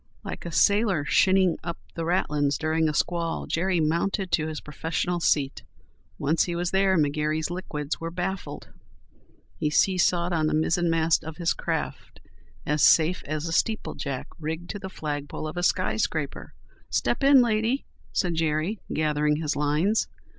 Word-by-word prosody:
Like -, -, -6 dB
a -, -, -5 dB
sailor 200 Hz, -4 st, +3 dB
shinning 185 Hz, +1 st, +3 dB
up 170 Hz, 0 st, -4 dB, 0.2 s
the 165 Hz, -, -3 dB
ratlins 150 Hz, -5 st, +1 dB
during 160 Hz, 0 st, +1 dB
a -, -, -2 dB
squall 170 Hz, 0 st, -1 dB
Jerry 175 Hz, +1 st, 0 dB
mounted 170 Hz, +4 st, 0 dB
to 160 Hz, -1 st, +1 dB
his 155 Hz, -1 st, -4 dB
professional 165 Hz, +4 st, -2 dB
seat. 145 Hz, -4 st, +1 dB, 0.6 s
Once 155 Hz, +4 st, +1 dB
he 175 Hz, -, -3 dB
was 175 Hz, 0 st, -1 dB
there 190 Hz, -1 st, +3 dB
McGary's 155 Hz, +2 st, 0 dB
liquids 150 Hz, -5 st, -4 dB
were 165 Hz, -, -3 dB
baffled. 185 Hz, +2 st, -5 dB, 0.9 s
He 150 Hz, -, +1 dB
seesawed 175 Hz, +1 st, +2 dB
on 155 Hz, -2 st, +1 dB
the 155 Hz, -, +1 dB
mizzenmast 165 Hz, 0 st, +2 dB
of 160 Hz, -1 st, -8 dB
his 170 Hz, -2 st, +1 dB
craft -, -, -4 dB, 0.5 s
as 150 Hz, 0 st, 0 dB
safe 165 Hz, +3 st, +5 dB
as 155 Hz, +1 st, -3 dB
a -, -, -3 dB
Steeple 220 Hz, +5 st, 0 dB
Jack 135 Hz, -3 st, -4 dB
rigged 160 Hz, +3 st, -4 dB
to 205 Hz, -, -6 dB
the 190 Hz, -1 st, -6 dB
flagpole 150 Hz, -3 st, -4 dB
of 155 Hz, -, -6 dB
a 175 Hz, -, -2 dB
skyscraper. 175 Hz, -, -1 dB, 0.3 s
"Step -, -, 0 dB
in, 275 Hz, 0 st, +7 dB
lady," 230 Hz, +3 st, 0 dB, 0.3 s
said 175 Hz, -2 st, 0 dB
Jerry, 160 Hz, +5 st, 0 dB
gathering 150 Hz, -1 st, +1 dB
his 150 Hz, -1 st, -2 dB
lines. 150 Hz, +9 st, +1 dB
165 Hz, 155 wpm, -26 LUFS, 155-180 Hz, 0.9 s, in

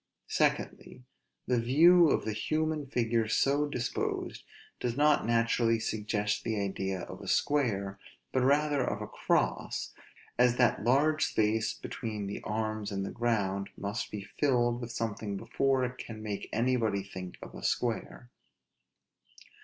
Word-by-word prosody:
Secondly, 125 Hz, -, -1 dB, 0.4 s
the 125 Hz, -1 st, +2 dB
view 165 Hz, +8 st, +6 dB
of -, -, +1 dB
the 110 Hz, -, -1 dB
human 155 Hz, +6 st, -1 dB
figure 115 Hz, -3 st, +1 dB
so 140 Hz, +6 st, +2 dB
disposed, 125 Hz, -4 st, -3 dB, 0.4 s
does 120 Hz, 0 st, -2 dB
not 150 Hz, -4 st, +4 dB
naturally 115 Hz, 0 st, +2 dB
suggest 105 Hz, -2 st, -1 dB
the 110 Hz, -2 st, -1 dB
idea 95 Hz, -1 st, -2 dB
of -, -, -8 dB
a -, -, -9 dB
square, 100 Hz, -9 st, +1 dB, 0.3 s
but 130 Hz, -, +1 dB
rather 145 Hz, +2 st, +3 dB
of -, -, -2 dB
a -, -, -4 dB
cross; -, -, -1 dB, 0.5 s
as 125 Hz, -1 st, +5 dB
that 125 Hz, -4 st, +2 dB
large 145 Hz, +6 st, +3 dB
space 110 Hz, 0 st, +1 dB
be -, -, -8 dB
tween 110 Hz, -3 st, -4 dB
the 100 Hz, -, -5 dB
arms 110 Hz, -1 st, -2 dB
and 95 Hz, -1 st, -2 dB
the -, -, -5 dB
ground 100 Hz, -5 st, -1 dB
must 100 Hz, +3 st, -3 dB
be 105 Hz, -2 st, -6 dB
filled 120 Hz, 0 st, +1 dB
with 120 Hz, 0 st, -5 dB
something 110 Hz, -3 st, -3 dB
before 130 Hz, +4 st, +1 dB
it 125 Hz, +1 st, -6 dB
can 110 Hz, -2 st, -7 dB
make 105 Hz, -2 st, -4 dB
anybody 115 Hz, -4 st, +1 dB
think 95 Hz, -2 st, -8 dB
of -, -, -10 dB
a -, -, -9 dB
square. 120 Hz, +1 st, -2 dB
115 Hz, 145 wpm, -30 LUFS, 105-130 Hz, 0.5 s, view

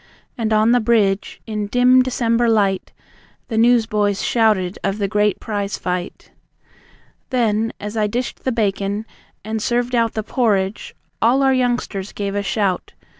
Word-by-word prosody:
And 225 Hz, -3 st, -2 dB
on 215 Hz, +1 st, +4 dB
the 245 Hz, -, +4 dB
bridge, 215 Hz, -4 st, +1 dB
in 210 Hz, -2 st, -3 dB
dim 250 Hz, +3 st, +5 dB
December 235 Hz, -2 st, +1 dB
light, 200 Hz, -4 st, +1 dB, 0.6 s
The 225 Hz, -, -2 dB
newsboys 220 Hz, -4 st, +2 dB
shouted 210 Hz, -5 st, +1 dB
of 195 Hz, +1 st, -1 dB
the 200 Hz, -2 st, -1 dB
great 210 Hz, 0 st, +1 dB
prize 205 Hz, -2 st, -3 dB
fight. 180 Hz, -1 st, -5 dB, 1.0 s
Then, 225 Hz, -3 st, +1 dB
as 210 Hz, +1 st, -6 dB
I 215 Hz, -1 st, +1 dB
dished 240 Hz, +4 st, -4 dB
the 260 Hz, -, 0 dB
bacon, 205 Hz, -2 st, -1 dB, 0.4 s
and 220 Hz, 0 st, -3 dB
served 245 Hz, +2 st, 0 dB
out 230 Hz, -2 st, +2 dB
The 220 Hz, -, -2 dB
porridge, 205 Hz, -4 st, -1 dB, 0.3 s
all 255 Hz, +4 st, +3 dB
our 265 Hz, 0 st, +4 dB
youngsters 245 Hz, -6 st, -1 dB
gave 200 Hz, -1 st, -3 dB
a 205 Hz, -, -1 dB
shout. 200 Hz, -2 st, -1 dB
220 Hz, 150 wpm, -20 LUFS, 205-235 Hz, 1.0 s, dim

